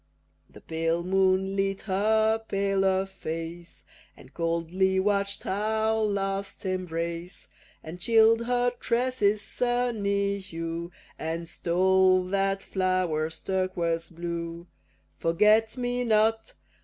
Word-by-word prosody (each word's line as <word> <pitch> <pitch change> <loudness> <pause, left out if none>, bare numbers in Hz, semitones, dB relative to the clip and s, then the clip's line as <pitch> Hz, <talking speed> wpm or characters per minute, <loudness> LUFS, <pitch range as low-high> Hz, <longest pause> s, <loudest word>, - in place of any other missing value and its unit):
The - - -15
pale 165 +1 -1
moon 190 +1 +2
lit 195 0 -1
her 220 +3 +2
paler 195 -2 +1
face, 170 -2 -7 0.3
And 130 - -16
coldly 170 +3 0
watch'd 200 0 0
our 220 +2 0
last 200 0 -2
embrace, 170 -1 -4 0.4
And 165 +3 -8
chill'd 225 +3 +4
her 245 0 +2
tresses' 235 -4 +1
sunny 205 -5 0
hue, 170 -2 -5 0.3
And 165 +1 -3
stole 185 +2 +3
that 195 0 0
flower's 180 -4 -1
turquoise 175 -3 -1
blue. 170 0 -5 0.5
Forget 215 +7 +3
me 245 0 -1
not! 220 0 +1
190 Hz, 100 wpm, -27 LUFS, 170-215 Hz, 0.5 s, chill'd